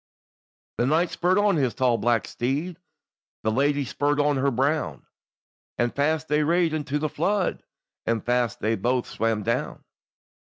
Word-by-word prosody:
The 120 - +2
knight 165 +4 +2
spurred 180 +2 +1
on 205 -3 +3
his 130 -5 0
tall 125 -3 +2
black 120 -2 +1
steed; 145 +8 -2 0.7
The 110 - +1
lady 140 +3 +1
spurred 145 +3 0
on 145 -1 +2
her 140 +1 +2
brown; 140 +5 -1 0.7
And 120 0 0
fast 155 +2 0
they 150 +1 +2
rade 165 +1 +2
unto 150 -2 -1
the 155 +1 -1
flood, 185 +5 -1 0.5
And 115 -2 0
fast 120 -2 0
they 110 +1 +1
baith 120 +4 0
swam 110 -2 -1
down. 115 +4 -2
140 Hz, 155 wpm, -25 LUFS, 120-155 Hz, 0.7 s, on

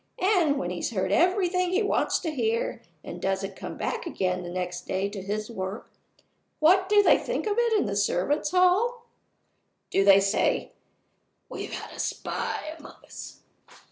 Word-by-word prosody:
And 365 -9 +2
when 180 -6 -2
he's 175 - -2
heard 190 -4 -1
everything 365 - +2
he 380 +4 +1
wants 405 - +1
to 325 - -2
hear, 230 -5 -1 0.2
and 175 - -8
doesn't 195 +1 -2
come - - -7
back - - -3
again 185 - -1
the 175 - -7
next 180 0 -4
day 190 +1 -1
to 200 -1 -6
his 210 +2 -3
work 190 0 -6 0.7
what 370 +4 +4
do 415 0 +6
they - - +5
think - - -3
of 425 +2 0
it 465 -3 +3
in - - 0
the 200 -1 -2
servants' 205 - +1
hall? 390 +7 +2 0.9
Do 195 - +3
they 195 0 +7
say, 195 +1 +1 0.8
'We've - - -6
had - - -6
a - - -11
spy 310 - -3
among 300 - -12
us! - - -10
235 Hz, 170 wpm, -26 LUFS, -, 0.9 s, they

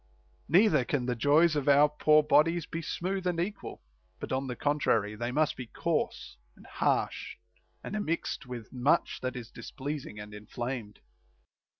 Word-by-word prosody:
* - - -36
Neither 165 - +5
can 125 0 -1
the 125 -1 -1
joys 150 +6 +4
of 145 -1 0
our 145 +1 +7
poor 150 +1 +4
bodies 165 +2 +3
be 165 - -5
smooth 185 +3 -3
and 175 -2 0
equal; 200 +4 -4 0.4
but - - -6
on 130 +1 -1
the 125 - -4
contrary 120 -8 +1
they 120 +3 -3
must 150 +2 +1
be 125 -2 -7
coarse - - -2 0.2
and - - -17
harsh, - - -1 0.5
and - - -6
immixed 170 -8 -2
with 120 -3 -8
much 135 +7 +1
that 130 0 -3
is 115 -2 -8
displeasing 130 -1 -6
and 105 0 -9
inflamed. 110 +1 -6
145 Hz, 165 wpm, -29 LUFS, 120-160 Hz, 0.5 s, our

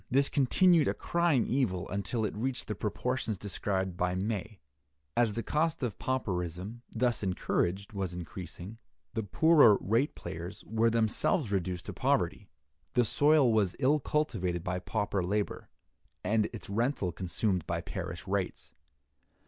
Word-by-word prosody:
This 140 +2 +3
continued 160 +4 +4
a - - 0
crying 170 -8 +2
evil 110 -10 0
until 105 +3 -1
it - - -3
reached 125 +3 -2
the 105 - -1
proportions 110 +2 -2
described 95 -1 -2
by 90 0 0
May: 105 +1 -3 0.6
"As 115 -3 +3
the 115 - -3
cost 160 0 0
of 110 -7 -3
pauperism, 95 -3 -3
thus 120 -1 0
encouraged, 95 0 -1
was 95 -3 -2
increasing, 90 +4 -7 0.3
the 115 - -1
poorer 120 - +6
rate 115 +8 +1
payers 90 +5 -7
were 110 +1 +2
themselves 115 - +1
reduced 90 -2 -1
to - - -5
poverty. 105 -7 0 0.4
The 120 - +4
soil 145 0 +4
was 100 -4 +2
ill 145 +3 +3
cultivated 95 - -1
by 90 0 -2
pauper 100 +1 -1
labor, 100 +3 -2 0.5
and 110 0 +2
its 115 - -7
rental 110 -2 0
consumed 90 +1 -1
by 85 0 -1
parish 85 -1 -6
rates. 95 -1 -3
105 Hz, 140 wpm, -30 LUFS, 95-125 Hz, 0.6 s, poorer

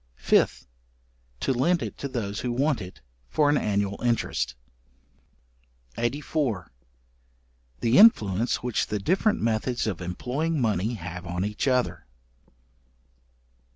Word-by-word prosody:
5th. - - +2 0.8
To 135 - +1
lend 165 +8 +2
it - - -5
to 140 - -3
those 105 -6 -3
who 125 - -2
want 135 0 +1
it, 90 -8 -10 0.3
for 145 -1 +3
an 145 - +3
annual 100 -1 -1
interest. 120 - 0 1.4
§84. 125 - -1 1.1
The 115 +9 +4
influence 115 - +5
which 125 -2 0
the 105 - -2
different 185 - +1
methods 115 +2 0
of 95 -5 -3
employing 135 - -2
money 110 -1 0
have 90 -1 -7
on 90 +2 -2
each 105 +6 -2
other. 125 - 0
120 Hz, 120 wpm, -26 LUFS, 100-140 Hz, 1.4 s, influence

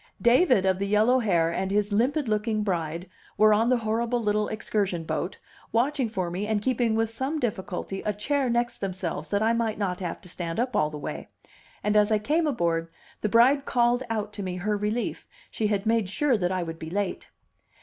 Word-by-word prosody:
David 245 - +4
of 190 -1 +2
the 200 - -1
yellow 215 +5 +4
heir 170 -8 +2
and 190 +2 -1
his 205 +1 +1
limpid 265 +6 +1
looking 215 0 0
bride 170 -2 -2 0.3
were 215 +1 +6
on 225 +3 +3
the 255 - +4
horrible 230 +2 0
little 210 -1 +1
excursion 200 -5 -1
boat, 160 +3 -3 0.3
watching 255 +1 +1
for 185 -5 -2
me 195 +4 -3
and 215 -1 +1
keeping 235 0 +1
with 225 0 +1
some 265 +7 -2
difficulty 195 -5 -3
a 210 - -1
chair 265 +6 0
next 240 0 0
themselves 185 -3 -4
that 205 +1 +1
I 225 +1 +3
might 230 -2 0
not 185 -4 -2
have 175 -3 -4
to 190 - -11
stand 170 +1 -4
up 250 +1 -1
all 150 - +2
the 150 - -7
way; 145 - -6 0.5
and, 210 0 +1
as 210 +1 +4
I 215 - +4
came 305 +10 +1
aboard, 170 - 0 0.3
the 215 - 0
bride 260 +6 +5
called 240 0 +2
out 215 -2 -2
to 205 - -6
me 185 -2 -3
her 205 +4 -1
relief, 210 +3 -2 0.2
she 215 - 0
had 205 -1 -1
made 225 -3 +2
sure 270 +6 +2
that 180 -4 0
I 185 -1 -1
would 165 -1 -6
be 160 - -6
late. 200 +1 -3
210 Hz, 210 wpm, -26 LUFS, 190-235 Hz, 0.5 s, were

